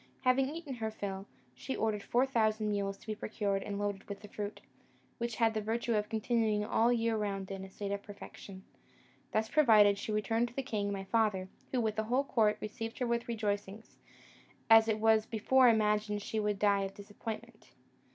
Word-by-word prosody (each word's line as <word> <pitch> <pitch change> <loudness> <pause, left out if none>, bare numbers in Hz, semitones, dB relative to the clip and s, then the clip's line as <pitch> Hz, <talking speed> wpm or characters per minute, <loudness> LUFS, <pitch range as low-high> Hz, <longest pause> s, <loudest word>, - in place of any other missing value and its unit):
Having 265 +1 +3
eaten 310 -2 -6
her 220 -1 -2
fill, 200 -2 -5 0.3
she 265 - -5
ordered 215 -2 0
four 245 +5 +2
thousand 220 -4 +1
mules 200 -1 -2
to - - -19
be 215 - -2
procured 205 -2 -2
and 200 0 -4
loaded 205 -1 -3
with 200 0 -6
the 210 - -10
fruit, 205 0 -5 0.6
which 235 -1 -2
had 225 -1 +2
the 215 - -1
virtue 230 +2 -1
of 210 -1 0
continuing 220 -2 +1
all 225 +2 +2
the 245 - +3
year 230 0 +1
round 200 -2 -3
in 195 0 -5
a 190 - -9
state 200 +1 -5
of 200 0 -2
perfection. 200 -1 -11 0.7
Thus 220 0 +1
provided, 215 -8 +5
she 215 - -4
returned 225 +2 +1
to 240 - -14
the 270 - -2
king 210 -6 -2
my 195 -1 -3
father, 195 -3 +1 0.2
who, 255 - +1
with 220 -2 -1
the 220 - 0
whole 250 +5 +2
court, 220 -6 +2
received 225 +2 -5
her 250 - -1
with 235 0 -1
rejoicings, 210 -2 -4 0.7
as 225 0 +8
it 220 -1 +1
was 220 0 +3
before 250 +3 +4
imagined 210 -2 +1
she 220 - -2
would 210 -1 0
die 200 0 +3
of 195 0 -4
disappointment. 220 +2 -8
215 Hz, 200 wpm, -32 LUFS, 205-230 Hz, 0.7 s, as